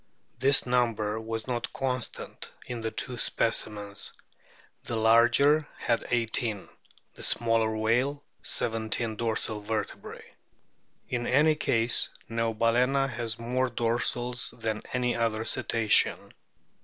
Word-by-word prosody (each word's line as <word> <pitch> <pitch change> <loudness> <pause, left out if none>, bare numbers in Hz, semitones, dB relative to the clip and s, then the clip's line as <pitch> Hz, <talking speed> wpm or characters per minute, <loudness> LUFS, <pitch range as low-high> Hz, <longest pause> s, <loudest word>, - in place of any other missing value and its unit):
This 135 +1 +5
number 115 -4 +1
was 115 0 -4
not 120 -2 -3
constant 130 -3 -3
in 120 -1 -5
the 115 0 -2
two 120 +2 -4
specimens; 105 -3 -1 0.7
the 115 - -3
larger 120 +7 +4
had 115 - -1
eighteen, 115 -3 0 0.5
the - - -13
smaller 115 -1 +1
whale 125 +6 +1 0.2
seventeen 110 0 -1
dorsal 110 -1 -1
vertebrae. 110 +1 -5 0.8
In 120 -1 -2
any 150 +4 +4
case 120 -6 +1 0.2
Neobal&na 115 +4 +1
has 115 -2 -3
more 125 +2 -1
dorsals 120 +1 -1
than 110 -1 -2
any 125 -1 0
other 110 -1 0
Cetacean. 115 -2 +2
115 Hz, 105 wpm, -28 LUFS, 110-125 Hz, 0.8 s, This